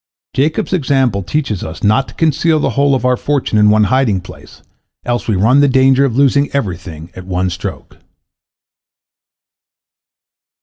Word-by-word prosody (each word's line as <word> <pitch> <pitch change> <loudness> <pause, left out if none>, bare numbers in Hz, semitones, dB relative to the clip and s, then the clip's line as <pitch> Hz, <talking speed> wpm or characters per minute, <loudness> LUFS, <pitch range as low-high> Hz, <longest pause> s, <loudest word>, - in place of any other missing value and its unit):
Jacob's 150 +7 -1
example 135 - +1
teaches 115 - -3
us 80 - -8
not 110 +6 +2
to - - -13
conceal 160 0 +1
the 135 - -1
whole 140 +3 +2
of 125 -1 -3
our 125 0 +3
fortune 135 -5 -1
in 105 0 +5
one 105 0 +4
hiding 120 -3 +1
place, 90 - -14 0.4
else 120 0 -2
we 110 - +1
run 115 +9 +3
the 145 - +4
danger 135 +1 +3
of 125 -3 -2
losing 140 +1 +2
everything 90 - -5
at 95 0 -10
one 90 0 -1
stroke. 90 +1 -7
125 Hz, 155 wpm, -15 LUFS, 100-140 Hz, 0.4 s, in